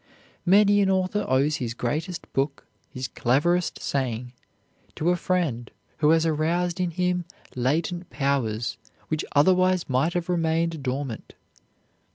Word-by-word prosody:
Many 205 +2 +5
an 195 - +2
author 190 +2 +1
owes 140 +4 +2
his 115 -4 -4
greatest 155 +9 -3
book, 135 +1 -1 0.3
his 130 0 -4
cleverest 160 +10 +1
saying 125 -3 -2 0.6
to 170 +3 +1
a - - +3
friend 165 - -1 0.3
who 150 -1 +3
has 165 0 +4
aroused 170 +3 0
in 180 -1 +1
him 180 +1 0 0.3
latent 165 +8 -1
powers 115 -6 -1 0.3
which 155 -1 -1
otherwise 185 +3 +4
might 135 +5 +1
have 175 -1 -2
remained 165 -2 0
dormant. 130 -2 -4
160 Hz, 130 wpm, -25 LUFS, 130-180 Hz, 0.6 s, Many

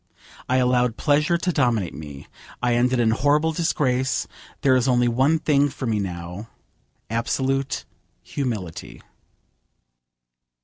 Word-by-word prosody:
I 130 - +3
allowed 125 -2 +2
pleasure 150 +3 +2
to 180 +2 -1
dominate 120 - +1
me. 75 -2 -9 0.3
I 125 -1 +1
ended 125 +1 +2
in 115 -2 +3
horrible 145 +6 +2
disgrace. 130 -5 0 0.4
There 130 -2 +4
is 130 0 +2
only 125 -1 +3
one 135 +7 +3
thing 145 -2 +2
for 135 -1 -6
me 110 -3 0
now, 90 +2 -6 0.6
absolute 135 +4 -1 0.4
humility. 110 - -5
125 Hz, 120 wpm, -23 LUFS, 115-140 Hz, 0.6 s, There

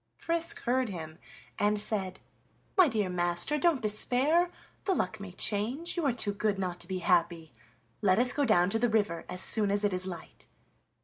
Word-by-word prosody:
Frisk 335 0 -2
heard 255 0 0
him 160 -4 -8 0.4
and 210 0 +2
said: 195 -3 0 0.6
"My 370 -4 +6
dear 215 -7 -1
master, 175 +10 0
don't 320 -8 +1
despair; 260 +11 +2 0.4
the 385 - +1
luck 205 - -2
may 200 -2 -8
change, 225 - 0
you 345 - -2
are - - +3
too 220 -4 -2
good 205 0 -1
not 180 -2 -4
to 175 - -7
be 190 0 -3
happy. 170 -3 +1 0.5
Let 190 -2 +3
us 250 +2 +3
go 290 - 0
down 195 -7 +3
to 225 - 0
the 240 +1 +1
river 205 -6 -1
as 180 0 -3
soon 210 -2 +4
as 205 +1 0
it 205 -2 +1
is 185 +1 +1
light." 175 -3 -10
205 Hz, 190 wpm, -29 LUFS, 185-250 Hz, 0.6 s, My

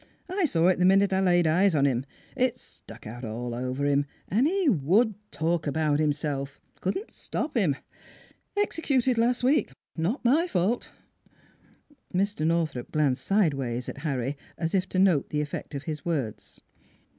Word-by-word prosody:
" - - -40
I 375 0 +1
saw 170 - +2
it 185 - +2
the 180 - +4
minute 195 +1 +4
I 190 - +2
laid 175 -2 +3
eyes 175 +3 +3
on 140 -1 +3
him. 130 0 0 0.3
It 250 -1 +1
stuck 115 - -11
out 120 +4 -8
all 120 +2 -4
over 130 +3 -2
him; 145 0 +2 0.2
and 235 +9 +2
he 380 0 +1
would 205 - +3 0.2
talk 160 +3 -1
about 150 0 +1
himself. 145 -2 -1 0.2
Couldn't 200 - -3
stop 300 -1 -4
him..... 180 - +2 0.8
Executed 270 - +1
last 245 +1 +2
week. 280 +5 +2 0.2
Not 185 - -2
my 305 +9 +4
fault." 215 - 0 1.3
Mr. 195 -4 +1
Northrup 160 -7 -1
glanced 140 -4 +1
sidewise 135 - 0
at - - -6
Harry, 135 -3 -2 0.2
as 165 -1 -2
if 185 -1 +1
to - - -3
note 185 -7 +3
the 150 - 0
effect 150 0 -5
of 140 - -4
his 150 -2 -5
words. 140 -11 -4
165 Hz, 165 wpm, -27 LUFS, 140-210 Hz, 1.3 s, the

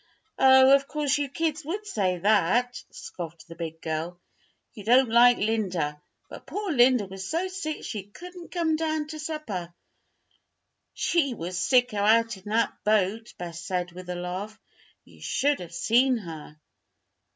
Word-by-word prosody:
"Oh, 265 0 +7
of 275 0 +3
course 295 0 0
you 285 -1 -2
kids 310 +2 -2
would 390 +8 -4
say 190 - 0
that," 215 +6 +2
scoffed 170 -2 -9
the 165 - -9
big 165 -1 -6
girl. 165 +2 -3 0.5
"You 210 - -10
don't 245 +3 +4
like 240 +1 +6
Linda. 185 -9 -1 0.3
But - - -12
poor 410 -2 -3
Linda 250 -5 +4
was 190 0 -7
so 345 +3 -1
sick 370 -5 -5
she 205 -3 -5
couldn't 355 - -11
come 330 -3 +1
down 315 -1 -1
to 310 0 -7
supper." 275 - -5 1.2
"She 280 -7 +1
was 180 -1 -4
sicker 245 -1 +2
out 225 +2 +3
in 190 +1 -16
that 225 +2 0
boat," 215 +2 0
Bess 170 -1 -7
said, 180 -1 -2
with 180 +1 -10
a 180 - -3
laugh. 185 +5 -5 0.5
"You - - -19
should 290 +1 +1
have 175 -2 -9
seen 250 +6 +3
her." 160 -6 -9
225 Hz, 155 wpm, -26 LUFS, 180-285 Hz, 1.2 s, Oh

